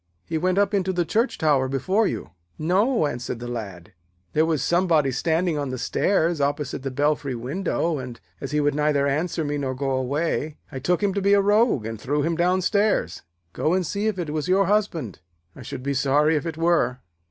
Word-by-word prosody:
'He 165 Hz, -, -4 dB
went 185 Hz, +2 st, +1 dB
up 200 Hz, +1 st, +2 dB
into 190 Hz, -2 st, +1 dB
the 175 Hz, -2 st, 0 dB
church 230 Hz, +9 st, 0 dB
tower 145 Hz, -4 st, +2 dB
before 185 Hz, -, +1 dB
you.' -, -, -5 dB, 0.3 s
'No,' 190 Hz, -, +2 dB
answered 125 Hz, -4 st, -3 dB
the 120 Hz, +1 st, -7 dB
Lad. 100 Hz, -8 st, -7 dB, 0.4 s
'There 155 Hz, +1 st, +3 dB
was 155 Hz, -4 st, 0 dB
somebody 170 Hz, -6 st, +2 dB
standing 160 Hz, +4 st, 0 dB
on 140 Hz, -2 st, -2 dB
the 130 Hz, -, -4 dB
stairs 170 Hz, +2 st, +1 dB
opposite 145 Hz, -1 st, -1 dB
the 135 Hz, -, -3 dB
belfry 145 Hz, 0 st, 0 dB
window, 160 Hz, +5 st, -2 dB
and, 125 Hz, -2 st, -7 dB, 0.2 s
as 140 Hz, -, -4 dB
he 150 Hz, -, 0 dB
would 145 Hz, 0 st, +2 dB
neither 150 Hz, -1 st, +1 dB
answer 155 Hz, +3 st, -1 dB
me 145 Hz, 0 st, -2 dB
nor 130 Hz, -2 st, -2 dB
go 135 Hz, +1 st, -2 dB
away, 145 Hz, +3 st, -1 dB
I 135 Hz, -, -5 dB
took 175 Hz, +8 st, 0 dB
him 200 Hz, -1 st, +2 dB
to 200 Hz, -, -1 dB
be 200 Hz, +1 st, +3 dB
a -, -, +4 dB
rogue 205 Hz, -, +3 dB
and 115 Hz, -1 st, -6 dB
threw 145 Hz, +2 st, 0 dB
him 165 Hz, +2 st, 0 dB
downstairs. 185 Hz, +4 st, +1 dB, 0.3 s
Go 160 Hz, +4 st, +1 dB
and 185 Hz, -1 st, 0 dB
see 205 Hz, +6 st, -2 dB
if 215 Hz, -3 st, -1 dB
it 165 Hz, -4 st, -3 dB
was 155 Hz, +1 st, -2 dB
your 195 Hz, +2 st, +3 dB
husband; 185 Hz, -, -1 dB, 0.4 s
I -, -, -11 dB
should 125 Hz, -, -7 dB
be 140 Hz, +1 st, -1 dB
sorry 145 Hz, +4 st, +3 dB
if 155 Hz, +3 st, -1 dB
it 160 Hz, -1 st, -5 dB
were.' 165 Hz, -7 st, +1 dB
155 Hz, 210 wpm, -24 LUFS, 135-185 Hz, 0.4 s, a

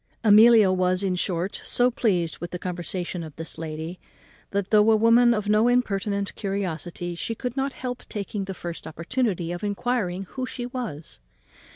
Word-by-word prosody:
Amelia 215 Hz, -1 st, +7 dB
was 185 Hz, +1 st, +1 dB
in 185 Hz, -2 st, +1 dB
short 180 Hz, +1 st, -2 dB
so 245 Hz, +1 st, +2 dB
pleased 180 Hz, -9 st, 0 dB
with 175 Hz, -, -5 dB
the 180 Hz, -, -5 dB
conversation 180 Hz, 0 st, -4 dB
of 155 Hz, -2 st, -10 dB
this 165 Hz, 0 st, -7 dB
lady, 160 Hz, +2 st, -5 dB, 0.5 s
that, 200 Hz, -1 st, -2 dB
though 210 Hz, 0 st, +6 dB
a 220 Hz, -, +6 dB
woman 230 Hz, +2 st, +5 dB
of 210 Hz, -3 st, 0 dB
no 215 Hz, +2 st, +4 dB
impertinent 200 Hz, -4 st, 0 dB
curiosity, 175 Hz, -3 st, -3 dB
she 225 Hz, +6 st, -4 dB
could 250 Hz, +2 st, -4 dB
not 270 Hz, 0 st, -1 dB
help 250 Hz, -1 st, -6 dB
taking 205 Hz, -1 st, -4 dB
the 190 Hz, -1 st, -6 dB
first 170 Hz, -1 st, -6 dB
opportunity 175 Hz, 0 st, -2 dB
of 175 Hz, +2 st, -5 dB
enquiring 205 Hz, -3 st, -1 dB
who 255 Hz, -1 st, -4 dB
she 245 Hz, -1 st, -5 dB
was. 235 Hz, -, -6 dB
200 Hz, 170 wpm, -25 LUFS, 175-230 Hz, 0.5 s, Amelia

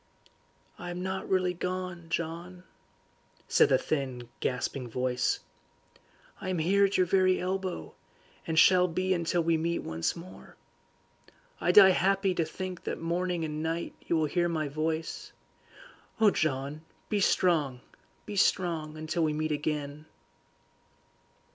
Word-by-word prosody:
"I 175 Hz, -, -6 dB
am 175 Hz, +1 st, -4 dB
not 190 Hz, 0 st, -4 dB
really 185 Hz, -1 st, +2 dB
gone, 180 Hz, -1 st, -4 dB
John," 170 Hz, +2 st, -4 dB, 0.8 s
said -, -, +5 dB
the -, -, +5 dB
thin, 130 Hz, -5 st, -3 dB
gasping 125 Hz, 0 st, -2 dB
voice. 125 Hz, +1 st, 0 dB, 1.0 s
"I 185 Hz, -, -4 dB
am 185 Hz, -, 0 dB
here 195 Hz, +5 st, +3 dB
at 195 Hz, -, 0 dB
your 185 Hz, -, +4 dB
very 185 Hz, 0 st, +3 dB
elbow, 185 Hz, 0 st, -3 dB, 0.5 s
and 160 Hz, -1 st, -2 dB
shall 180 Hz, +2 st, +6 dB
be 185 Hz, +2 st, 0 dB
until 170 Hz, 0 st, 0 dB
we 165 Hz, 0 st, +2 dB
meet 170 Hz, +1 st, -1 dB
once 80 Hz, +1 st, -2 dB
more. 175 Hz, +2 st, -12 dB, 1.0 s
I -, -, +2 dB
die 195 Hz, -2 st, +9 dB
happy 195 Hz, +1 st, +2 dB
to 170 Hz, -2 st, 0 dB
think 185 Hz, +1 st, -6 dB
that -, -, -3 dB
morning 175 Hz, 0 st, -1 dB
and 155 Hz, 0 st, -4 dB
night 165 Hz, +1 st, -2 dB
you -, -, +1 dB
will 160 Hz, -1 st, +2 dB
hear 175 Hz, +3 st, +1 dB
my 155 Hz, -3 st, -1 dB
voice. 160 Hz, +2 st, -3 dB, 0.9 s
Oh, 215 Hz, -2 st, +6 dB
John, 145 Hz, -1 st, -1 dB, 0.3 s
be 210 Hz, -, 0 dB
strong, 155 Hz, -10 st, +2 dB, 0.4 s
be 205 Hz, -, -6 dB
strong, 165 Hz, -5 st, +1 dB
until 155 Hz, +2 st, -1 dB
we 155 Hz, -1 st, +1 dB
meet 155 Hz, +1 st, -1 dB
again." 150 Hz, 0 st, -3 dB
170 Hz, 140 wpm, -29 LUFS, 155-185 Hz, 1.0 s, die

